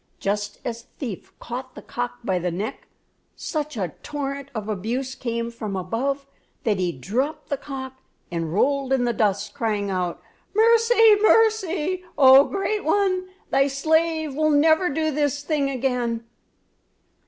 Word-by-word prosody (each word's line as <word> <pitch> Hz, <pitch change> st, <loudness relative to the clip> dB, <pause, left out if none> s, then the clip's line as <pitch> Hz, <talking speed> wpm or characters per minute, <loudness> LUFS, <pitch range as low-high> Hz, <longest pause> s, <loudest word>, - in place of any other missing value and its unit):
Just 205 Hz, +1 st, -2 dB
as 235 Hz, -1 st, -3 dB
the -, -, -28 dB
thief 230 Hz, -, -6 dB
caught 255 Hz, +2 st, -7 dB
the -, -, -9 dB
cock 245 Hz, 0 st, -4 dB
by 185 Hz, -4 st, 0 dB
the 180 Hz, +1 st, -1 dB
neck, 190 Hz, +6 st, -5 dB, 0.5 s
such 300 Hz, -4 st, -4 dB
a 180 Hz, -6 st, -2 dB
torrent 280 Hz, -1 st, -4 dB
of 215 Hz, -1 st, -4 dB
abuse 230 Hz, +6 st, -2 dB
came 235 Hz, -2 st, -3 dB
from 215 Hz, -4 st, -5 dB
above 255 Hz, +10 st, -2 dB, 0.4 s
that 210 Hz, -4 st, +1 dB
he 180 Hz, -2 st, +1 dB
dropped 255 Hz, -, -3 dB
the 280 Hz, -, 0 dB
cock 265 Hz, -2 st, -7 dB, 0.3 s
and 165 Hz, -2 st, -2 dB
rolled 270 Hz, +7 st, +1 dB
in 260 Hz, -2 st, +2 dB
the 240 Hz, -, +1 dB
dust, 205 Hz, -2 st, 0 dB
crying 210 Hz, -3 st, -1 dB
out: 180 Hz, -2 st, -2 dB, 0.4 s
"Mercy! 455 Hz, 0 st, +6 dB
mercy! 380 Hz, -6 st, +3 dB
Oh, 270 Hz, 0 st, +8 dB
great 405 Hz, +1 st, -2 dB
one, 370 Hz, +1 st, +1 dB, 0.2 s
thy 275 Hz, +1 st, +4 dB
slave 315 Hz, +2 st, +1 dB
will 310 Hz, +2 st, +2 dB
never 315 Hz, +4 st, +4 dB
do 315 Hz, +2 st, 0 dB
this 290 Hz, 0 st, 0 dB
thing 290 Hz, -2 st, 0 dB
again!" 245 Hz, -3 st, -1 dB
270 Hz, 150 wpm, -24 LUFS, 220-310 Hz, 0.5 s, Oh